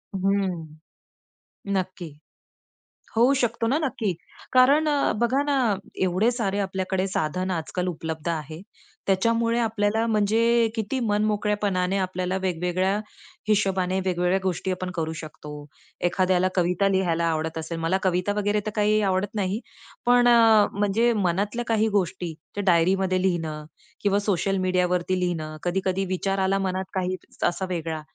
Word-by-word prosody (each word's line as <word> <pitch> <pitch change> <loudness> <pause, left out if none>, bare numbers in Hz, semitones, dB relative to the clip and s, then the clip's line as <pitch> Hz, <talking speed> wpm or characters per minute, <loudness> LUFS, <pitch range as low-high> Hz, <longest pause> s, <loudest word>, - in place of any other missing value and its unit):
हं. 190 -3 0 1.1
नक्की. 185 -3 -3 1.1
होऊ 240 +4 +5
शकतो 235 -1 0
ना 270 +7 +2
नक्की. 250 - -1 0.4
कारण 275 +5 +5
अ, 290 -2 +2
बघा 260 +4 +2
ना 285 - +1 0.5
एवढे 185 +5 +2
सारे 205 -5 -1
आपल्याकडे 190 -1 -1
साधन 185 +1 -2
आजकाल 180 +1 -2
उपलब्ध 160 -1 -4
आहे 155 -1 -4 0.5
त्याच्यामुळे 230 +4 +2
आपल्याला 220 0 +1
म्हणजे 215 0 +2 0.3
अ, - - -1
किती 225 +4 -2
मनमोकळ्यापणाने 205 -3 0
आपल्याला 185 0 -2
वेगवेगळ्या 185 +1 0 0.5
हिशोबाने 190 -2 +1
वेगवेगळ्या 180 0 +1
गोष्टी 190 0 -2
आपण 185 0 -4
करू 160 0 -1
शकतो. 155 -1 -10 0.6
एखाद्याला 185 0 +2
कविता 180 +2 +2
लिहायला 180 -4 +1
आवडत 160 0 -2
असेल. 160 +1 -5
मला 165 +3 +1
कविता 180 +1 +1
वगैरे 210 0 +1
तर 215 - 0
काही 210 +1 +3
आवडत 190 +3 -1
नाही. 200 +1 -1 0.5
पण 245 0 +5
अ, 225 -3 +6
म्हणजे 205 +4 +2
मनातल्या 205 +7 -1
काही 220 -1 +2
गोष्टी 180 -1 -3 0.2
त्या 205 - -3
डायरीमध्ये 185 +1 +3
लिहिणं 165 -5 -1 0.4
किंवा 200 0 +2
सोशल 195 -1 0
मीडियावरती 180 0 +1
लिहिणं, 160 -3 -2
कधी-कधी 190 +1 0
विचार 195 +1 -1
आला 190 +1 +2
मनात 190 -1 -1
काही 185 0 -1 0.3
असा 175 +2 -3
वेगळा 165 -3 -3
190 Hz, 135 wpm, -25 LUFS, 180-210 Hz, 1.1 s, अ